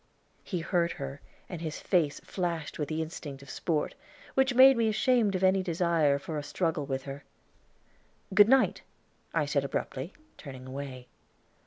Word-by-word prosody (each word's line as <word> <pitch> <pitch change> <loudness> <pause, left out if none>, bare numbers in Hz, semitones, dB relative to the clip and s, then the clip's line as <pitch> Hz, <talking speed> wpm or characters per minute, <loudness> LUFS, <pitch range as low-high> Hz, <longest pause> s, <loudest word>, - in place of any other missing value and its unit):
He 180 -4 -3
heard 170 0 +1
her 140 0 -7 0.3
and 175 -3 -7
his 160 -2 -4
face 165 -6 +1
flashed 170 -5 -3
with 150 - -2
the 160 0 -1
instinct 145 -4 -8
of 140 - -10
sport, 160 -3 -1 0.4
which 265 -1 +2
made 265 +1 +9
me 230 -2 +2
ashamed 220 -2 +2
of 185 - -1
any 190 0 +4
desire 170 -5 +2
for 150 +2 -4
a - - -6
struggle 155 -1 -1
with 135 -1 -2
her. 140 0 -7 1.1
"Good 205 +2 +7
night," 265 0 +4 0.5
I 160 -3 +1
said 145 -1 0
abruptly, 140 +3 -4 0.3
turning 130 -3 -9
away. 130 -1 -7
160 Hz, 160 wpm, -29 LUFS, 140-190 Hz, 1.1 s, made